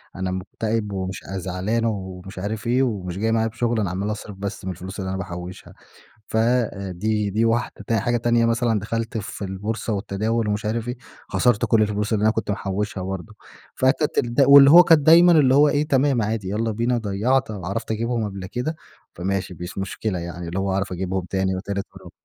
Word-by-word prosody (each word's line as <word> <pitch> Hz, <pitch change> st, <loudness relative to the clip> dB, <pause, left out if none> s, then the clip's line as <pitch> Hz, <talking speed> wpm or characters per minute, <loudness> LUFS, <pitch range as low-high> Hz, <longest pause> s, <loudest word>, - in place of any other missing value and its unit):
أنا 95 Hz, 0 st, -2 dB
مكتئِب 105 Hz, +3 st, -3 dB
ومش 95 Hz, -1 st, -4 dB
عاي 95 Hz, 0 st, -5 dB
زعلَان 95 Hz, +6 st, -2 dB
أو 95 Hz, -4 st, -3 dB
مش 95 Hz, -1 st, -8 dB
عارف 110 Hz, +4 st, -4 dB
إيه، 125 Hz, +2 st, +3 dB
ومش 95 Hz, -7 st, -3 dB
جاي 110 Hz, +2 st, 0 dB
معايا 115 Hz, 0 st, +2 dB
بشغل، 120 Hz, 0 st, -1 dB
أنا 100 Hz, -4 st, 0 dB
عمَّال 100 Hz, +4 st, -2 dB
أصرَف 105 Hz, -1 st, -7 dB
بس 100 Hz, 0 st, -5 dB
من 95 Hz, -, -2 dB
الفلوس 95 Hz, +3 st, -8 dB
اللي 95 Hz, 0 st, -3 dB
أنا 95 Hz, -, -2 dB
باحُوشها. 90 Hz, 0 st, -7 dB, 0.5 s
ف -, -, -4 dB
آآ، 110 Hz, -5 st, +1 dB
دي 105 Hz, +2 st, -1 dB
دي 110 Hz, +3 st, +1 dB
واحدة. 115 Hz, -1 st, 0 dB
حاجة 120 Hz, +4 st, 0 dB
تانية 120 Hz, 0 st, +2 dB
مثلًا، 115 Hz, -2 st, +1 dB
دخلت 115 Hz, +2 st, -3 dB
في 100 Hz, 0 st, -6 dB
البورصة 105 Hz, +4 st, -3 dB
والتداوُل 105 Hz, +2 st, -1 dB
ومش 105 Hz, +1 st, -1 dB
عارف 115 Hz, +2 st, -2 dB
إيه، 125 Hz, -, -3 dB, 0.3 s
خسرت 120 Hz, -4 st, +2 dB
كل 110 Hz, -2 st, +3 dB
الفلوس 105 Hz, +1 st, -1 dB
اللي 105 Hz, -, +1 dB
أنا 110 Hz, -, +5 dB
كنت 110 Hz, -1 st, -2 dB
محُوشها 100 Hz, 0 st, -3 dB
برضه. 95 Hz, -3 st, -6 dB, 0.4 s
فتت 130 Hz, +3 st, +1 dB
دل 120 Hz, +2 st, +3 dB
واللي 140 Hz, 0 st, +9 dB
هو 175 Hz, +2 st, +10 dB
كان 160 Hz, -3 st, +5 dB
دايمًا 170 Hz, +3 st, +7 dB
اللي 135 Hz, -5 st, +5 dB
هو 145 Hz, +1 st, +6 dB
إيه، 150 Hz, +1 st, 0 dB
تمام 135 Hz, -3 st, +2 dB
عادي، 105 Hz, -3 st, -2 dB
يالَّا 110 Hz, +3 st, -1 dB
بينا، 120 Hz, +3 st, 0 dB
ضيَّعت، 110 Hz, +5 st, 0 dB
عرَفت 105 Hz, +3 st, -5 dB
أجِيبهُم 115 Hz, +1 st, -1 dB
قبل 95 Hz, -2 st, -7 dB
كده، 125 Hz, -, -3 dB, 0.4 s
فماشي 95 Hz, +1 st, -3 dB
مش 90 Hz, +2 st, -6 dB
مشكلة، 95 Hz, 0 st, -3 dB
يعني 85 Hz, 0 st, -6 dB
اللي 90 Hz, -, -3 dB
هو 95 Hz, 0 st, -1 dB
هاعرَف 95 Hz, 0 st, -1 dB
أجِيبهُم 95 Hz, 0 st, -2 dB
تاني 95 Hz, -1 st, 0 dB
وتالت 100 Hz, +1 st, -4 dB
ورابع. -, -, -12 dB
105 Hz, 200 wpm, -23 LUFS, 95-115 Hz, 0.5 s, هو